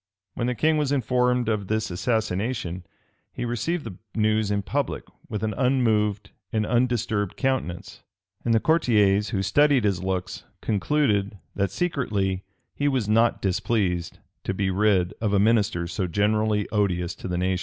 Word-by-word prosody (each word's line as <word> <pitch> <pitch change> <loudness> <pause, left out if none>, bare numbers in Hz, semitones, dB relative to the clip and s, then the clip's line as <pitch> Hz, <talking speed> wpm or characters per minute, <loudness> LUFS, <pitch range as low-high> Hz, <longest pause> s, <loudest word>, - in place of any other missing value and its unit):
[*] 95 0 -62
When 120 - -2
the 125 - -1
king 155 +5 +2
was 145 -2 0
informed 125 -2 +1
of 105 -3 -1
this 110 -2 -1
assassination, 100 -2 -2 0.4
he - - -4
received 145 +8 -2
the 90 - -8 0.2
news 110 -1 +2
in 100 -1 0
public - - -2 0.3
with 105 -1 -4
an 110 -1 0
unmoved 110 -6 +1 0.2
and 110 -3 0
undisturbed 120 -4 0
countenance; 130 -10 -2 0.4
and 120 - 0
the 115 - +4
courtiers, 105 -10 +3
who 95 -1 -1
studied 145 +4 +4
his 100 -4 +1
looks, 95 0 -3 0.2
concluded, 105 -3 0 0.2
that 100 -1 0
secretly 100 - -1 0.3
he 145 - -1
was 130 -7 0
not 115 +2 +2
displeased 95 -3 0 0.3
to 95 - -2
be 95 0 0
rid 95 -2 +2
of 105 -3 0
a 100 - +4
minister 100 -5 +2
so 90 +2 -2
generally 105 +3 +1
odious 90 -5 0
to - - -8
the 90 -1 -2
nation. 90 0 0
105 Hz, 160 wpm, -25 LUFS, 95-120 Hz, 0.4 s, the